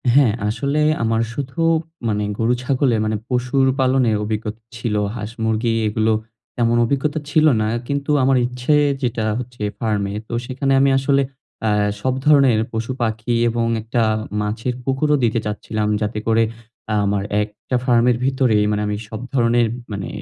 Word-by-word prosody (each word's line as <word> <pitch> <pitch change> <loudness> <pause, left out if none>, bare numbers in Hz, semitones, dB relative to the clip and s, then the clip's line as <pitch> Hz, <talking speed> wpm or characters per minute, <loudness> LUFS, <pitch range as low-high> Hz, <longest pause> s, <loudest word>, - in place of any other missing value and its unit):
হ্যাঁ, 135 -7 +5
আসলে 140 +7 -1 0.2
আমার 115 0 +1
শুধু 140 +4 -5 0.5
মানে 105 -1 0
গরু-ছাগলে 125 +2 +1
মানে 110 0 0
পশুর 125 +2 +1
পালনে 130 -2 +3
অভিজ্ঞতা 110 +1 -4 0.2
ছিল। 110 -1 -2 0.2
হাঁস-মুরগি 110 +1 -1
এগুলো 110 +1 +1 0.4
তেমন 120 -1 +2
অভিজ্ঞতা 145 +5 -1
ছিল 155 +1 +3 0.2
না। 110 - +1 0.2
কিন্তু 140 +1 -1
আমার 130 0 +4
ইচ্ছে 125 +4 -1 0.3
যেটা 120 -3 -1 0.2
হচ্ছে 125 -2 -9 0.2
ফার্মে, 105 -3 -1
তো - - -7
সেখানে 135 +2 -1
আমি 140 - +4
আসলে 140 +1 +2 0.5
আ - - +3 0.3
সব 130 +2 +1
ধরনের 140 -6 +5
পশু-পাখি 115 0 -2 0.2
এবং 115 0 0 0.2
একটা 115 +2 -1 0.4
মাছের 110 +4 -2
পুকুরও 135 +3 +1
দিতে 115 0 +2
চাচ্ছিলাম। 105 0 -2
যাতে 105 0 -1
করে, 115 0 +4 0.6
আমার 100 0 0 0.2
একটা 105 +4 -6
ফার্মের 120 -1 +3
ভিতরেই 130 -6 +2
মানে 105 0 0
আমি 105 0 -2
সব 110 - -6
ধরণের 120 -2 +3 0.2
মানে 100 -2 -4
120 Hz, 140 wpm, -20 LUFS, 110-130 Hz, 0.6 s, হ্যাঁ